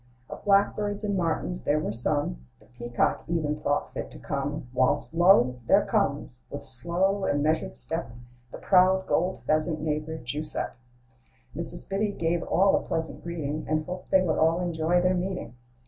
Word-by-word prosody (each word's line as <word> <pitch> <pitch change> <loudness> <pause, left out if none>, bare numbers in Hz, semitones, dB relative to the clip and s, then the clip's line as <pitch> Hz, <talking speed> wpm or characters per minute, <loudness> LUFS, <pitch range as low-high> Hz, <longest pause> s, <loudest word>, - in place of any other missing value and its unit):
Of - - -8
blackbirds 205 +1 +2
and 205 -1 0
martins 155 - -1
there 150 - +2
were 150 - -1
some; 120 - 0 0.2
The - - -21
peacock 120 -1 -1
even 160 -3 0
thought 145 -1 -1
fit - - -5
to - - -11
come; 140 - -3
Whilst 130 +4 +1
lo! 165 -8 +5
there - - +5
comes, - - -1
with - - -6
slow 180 +9 -1
and 145 0 +1
measured 150 - 0
step, 60 - -4 0.4
The - - -7
proud 190 0 +4
gold 180 +3 0
pheasant 155 +1 +1
bf - - -6
neighbor 155 +1 -2
Guiseppe. 150 +4 -4 0.8
Mrs. 170 +2 -4
Biddy 205 +1 -1
gave 170 -1 0
all 195 +1 +3
a - - -2
pleasant 160 0 -4
greeting, 155 -3 -3
And 155 0 0
hoped 180 +1 -7
they 190 -1 +4
would 160 -4 0
all 160 +2 +3
enjoy 175 0 +1
their 180 +1 +3
meeting. 180 -8 -3
160 Hz, 170 wpm, -27 LUFS, 145-180 Hz, 0.8 s, lo